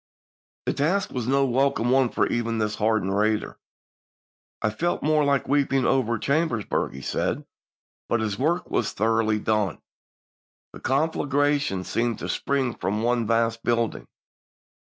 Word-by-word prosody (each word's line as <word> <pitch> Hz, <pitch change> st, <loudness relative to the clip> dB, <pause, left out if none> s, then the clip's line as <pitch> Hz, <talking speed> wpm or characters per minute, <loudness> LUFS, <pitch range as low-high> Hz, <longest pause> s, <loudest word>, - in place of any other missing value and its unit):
The -, -, 0 dB
task 180 Hz, +8 st, 0 dB
was 125 Hz, -3 st, -3 dB
no 135 Hz, +1 st, +3 dB
welcome 130 Hz, -1 st, +1 dB
one 130 Hz, -1 st, +4 dB
for -, -, +1 dB
even 115 Hz, -1 st, -1 dB
this 105 Hz, -1 st, 0 dB
hard 110 Hz, -1 st, +1 dB
ened 95 Hz, +1 st, -1 dB
raider. 105 Hz, +1 st, 0 dB, 1.0 s
"I 110 Hz, -, 0 dB
felt 170 Hz, +11 st, -1 dB
more 155 Hz, 0 st, +3 dB
like 140 Hz, -1 st, +1 dB
weeping 135 Hz, -2 st, +2 dB
over 120 Hz, -3 st, +2 dB
Chambersburg," 140 Hz, -, 0 dB
he 70 Hz, -, -8 dB
says, -, -, -1 dB, 0.7 s
but 120 Hz, -, +2 dB
his 105 Hz, -2 st, -2 dB
work 170 Hz, +6 st, 0 dB
was 110 Hz, -, 0 dB
thor 110 Hz, +1 st, +1 dB
oughly 110 Hz, -1 st, +1 dB
done. 105 Hz, -6 st, 0 dB, 0.5 s
" -, -, -86 dB
The -, -, -10 dB
conflagration 145 Hz, -, +1 dB
seemed 115 Hz, +4 st, -1 dB
to -, -, -6 dB
spring 135 Hz, -4 st, 0 dB
from 105 Hz, +3 st, -2 dB
one 120 Hz, -1 st, +1 dB
vast 115 Hz, 0 st, +1 dB
building. 115 Hz, -1 st, -1 dB
120 Hz, 155 wpm, -25 LUFS, 110-140 Hz, 1.0 s, one